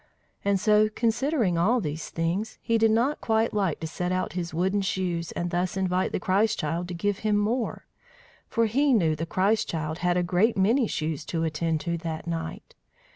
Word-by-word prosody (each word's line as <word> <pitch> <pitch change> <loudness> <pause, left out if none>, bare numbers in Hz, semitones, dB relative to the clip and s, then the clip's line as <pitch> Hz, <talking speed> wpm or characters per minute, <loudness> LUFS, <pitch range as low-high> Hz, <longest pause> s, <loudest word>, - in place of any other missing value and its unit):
And 200 -1 +2
so, 215 +1 +4
considering 230 - +1
all 230 +9 +3
these 155 -5 -4
things, 175 +7 -2
he 230 -1 +2
did 225 0 +4
not 240 +7 +1
quite 225 0 +1
like 195 -7 0
to - - -3
set 180 +3 -3
out 185 0 -1
his 175 -1 -3
wooden 190 +5 +1
shoes, 180 -3 -2
and 175 0 -3
thus 180 +1 -1
invite 185 -1 0
the - - -1
Christ 205 +5 +2
child 165 +4 -2
to 180 - -5
give 205 +3 -1
him 215 -1 +1
more; 225 +4 -1 0.6
for 230 -1 +1
he 270 +5 +2
knew 165 -9 +3
the 165 +2 -4
Christ 205 +5 +1
child 155 0 -3
had 180 0 +1
a 180 - +2
great 185 +6 +2
many 225 +6 +3
shoes 155 -4 -3
to 165 -1 -2
attend 160 0 -1
to 170 -1 -2
that 160 -1 -5
night. 165 -1 -5
185 Hz, 195 wpm, -26 LUFS, 170-220 Hz, 0.6 s, so